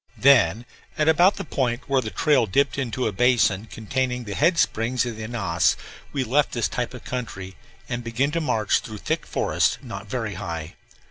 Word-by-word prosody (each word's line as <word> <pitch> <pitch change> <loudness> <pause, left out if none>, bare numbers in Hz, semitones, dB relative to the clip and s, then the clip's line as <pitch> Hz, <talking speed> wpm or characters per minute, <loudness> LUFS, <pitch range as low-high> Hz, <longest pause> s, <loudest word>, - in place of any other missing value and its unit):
Then, 125 -3 +4 0.3
at 150 - +1
about 175 +5 +5
the 195 - -5
point 125 -6 -2
where 135 -1 +2
the 110 - -4
trail 130 - +2
dipped 140 +7 +1
into 125 -1 -2
a 110 - +1
basin 110 -2 +2
containing 125 +3 -2
the 100 -3 -6
head 165 - +2
springs 120 -3 +1
of 120 -2 -4
the 110 0 -6
Ananas, 100 -7 +1 0.3
we 140 -2 -1
left 135 +5 +1
this 120 - +1
type 125 +1 -3
of 125 - -10
country 100 -7 -5 0.3
and 120 -1 -3
began 120 +5 0
to 170 +1 -1
march 115 -8 +1
through 110 -2 -8
thick - - -2
forest, - - +1
not - - -7
very - - -3
high. 85 -1 -5
125 Hz, 190 wpm, -24 LUFS, 110-140 Hz, 0.3 s, about